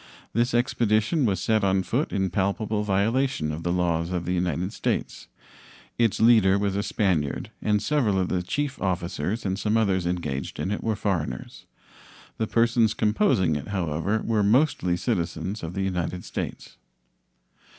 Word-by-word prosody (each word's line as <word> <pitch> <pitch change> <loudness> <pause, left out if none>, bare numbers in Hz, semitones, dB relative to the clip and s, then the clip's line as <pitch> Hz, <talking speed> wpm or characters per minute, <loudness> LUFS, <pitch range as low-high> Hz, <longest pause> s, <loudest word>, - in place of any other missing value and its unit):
This 120 +2 +1
expedition 120 +3 +2
was 95 -5 +1
set 110 +2 +1
on 95 -1 +2
foot 120 - -1
in 95 -2 0
palpable 100 +3 0
violation 105 - +1
of 75 +2 -5
the 85 - -1
laws 85 -2 0
of 90 -2 -2
the 90 - -1
United 90 +1 -1
States. - - -3 0.7
Its 115 -3 +2
leader 110 -4 +5
was 100 -1 -1
a 100 - +1
Spaniard, 95 -8 -1
and 105 -1 +2
several 125 -10 +1
of 95 -1 +1
the 90 -1 0
chief 140 +9 -3
officers 90 +2 -2
and 95 0 -1
some 105 +1 +1
others 95 -5 +1
engaged 75 -7 -3
in 95 - -2
it 105 - -3
were 110 -1 0
foreigners. 95 -7 -3 0.7
The 110 - 0
persons 115 -1 +2
composing 105 - +2
it, 75 - -4
however, 95 +2 -1
were 110 -2 +1
mostly 105 - +2
citizens 95 0 -2
of 85 +2 -6
the 100 - -1
United 90 -1 -2
States. - - -6
100 Hz, 160 wpm, -25 LUFS, 90-110 Hz, 0.7 s, leader